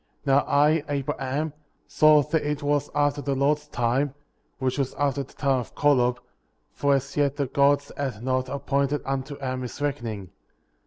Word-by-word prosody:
Now 135 0 +5
I, 150 +2 +3
Abraham, 140 +1 -2 0.3
saw 155 -1 +5
that 150 +2 0
it 150 0 -2
was 145 0 +1
after 145 0 +1
the 140 -1 -1
Lord's 150 +2 +1
time,^ 130 +2 0 0.4
which 130 +1 -1
was 135 -2 -1
after 140 0 0
the 135 - -10
time 135 -2 +1
of 120 - -8
Kolob;*' 125 -4 +3 0.6
for 140 -1 +2
as 140 +1 -3
yet 145 -1 +1
the 140 -1 0
Gods 140 +2 +2
had 130 -6 -4
not 130 0 0
appointed 140 +1 -1
unto 135 +1 -3
Adam 130 -2 -3
his 125 +1 -7
reckoning. 115 -10 -3
140 Hz, 165 wpm, -25 LUFS, 130-145 Hz, 0.6 s, Now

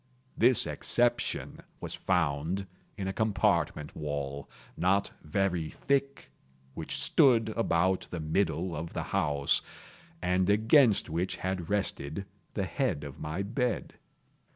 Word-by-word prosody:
This 120 +1 +5
exception 120 0 0 0.2
was - - -5
found 85 +2 0 0.3
in 95 -2 -3
a 95 - -2
compartment 95 -8 0
wall, 70 -2 -4 0.3
not 95 +3 +1
very 85 0 0
thick, 140 0 -1 0.4
which - - -4
stood 115 -5 +4
about 95 -4 +1
the 85 - -5
middle 80 +1 0
of 80 +2 -5
the - - -2
house, 70 -1 +2 0.6
and 90 - +1
against 110 +1 +5
which 85 +3 -2
had 95 -3 -3
rested 100 -4 -1 0.3
the - - 0
head 70 - -1
of 70 -1 -8
my 80 +6 -3
bed. 120 +3 -2
95 Hz, 120 wpm, -30 LUFS, 80-105 Hz, 0.6 s, This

